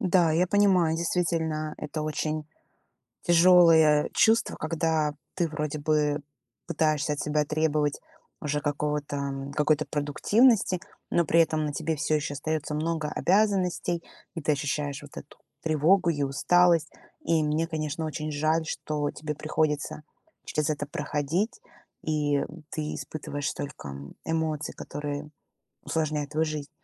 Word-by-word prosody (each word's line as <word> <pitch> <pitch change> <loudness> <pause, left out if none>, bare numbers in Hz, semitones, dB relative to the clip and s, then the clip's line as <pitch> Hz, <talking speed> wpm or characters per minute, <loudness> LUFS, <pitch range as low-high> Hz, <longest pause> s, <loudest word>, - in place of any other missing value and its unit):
Да, 180 -3 +3
я 175 +3 +3
понимаю, 185 -5 +3
действительно, 160 -2 -1
это 155 +1 -5
очень 155 0 -2 0.8
тяжелое 165 -3 +6
чувство, 225 +1 +3
когда 155 -2 0 0.2
ты 175 -3 0
вроде 150 -1 -3
бы 150 0 +1 0.5
пытаешься 155 -3 +1
от 145 - -5
себя 150 0 0
требовать 150 -1 +1 0.4
уже 150 0 -1
какого-то, 145 0 -2
м, 140 0 -4
какой-то 150 +1 +2
продуктивности, 185 - +3 0.3
но 170 - +3
при 165 +2 +4
этом 155 -1 +2
на 150 - -2
тебе 160 +2 -2
всё 155 +1 +1
еще 145 -1 -3
остается 150 +1 -2
много 155 0 -1
обязанностей, 185 -3 +1 0.3
и 165 - -5
ты 155 - +2
ощущаешь 145 0 -2
вот 145 -1 -14
эту 140 - -10 0.2
тревогу 165 +4 +3
и 145 -3 -1
усталость. 170 +4 +3 0.3
И 165 -1 +2
мне, 155 +2 +1
конечно, 160 -1 -3
очень 155 0 -3
жаль, 155 +2 +1
что 150 -1 -2
тебе 150 -1 -5
приходится 155 0 -1 0.4
через 150 -1 -1
это 145 -1 -1
проходить, 150 - -2 0.4
и 150 -2 +1 0.3
ты 155 -1 -3
испытываешь 145 -2 -4
столько, 140 - -6
м, 70 +1 -9
эмоций, 160 -2 -1
которые 145 0 -5 0.5
усложняют 150 -2 -1
твою 155 +1 +1
жизнь. 155 -2 -4
155 Hz, 135 wpm, -27 LUFS, 150-165 Hz, 0.8 s, тяжелое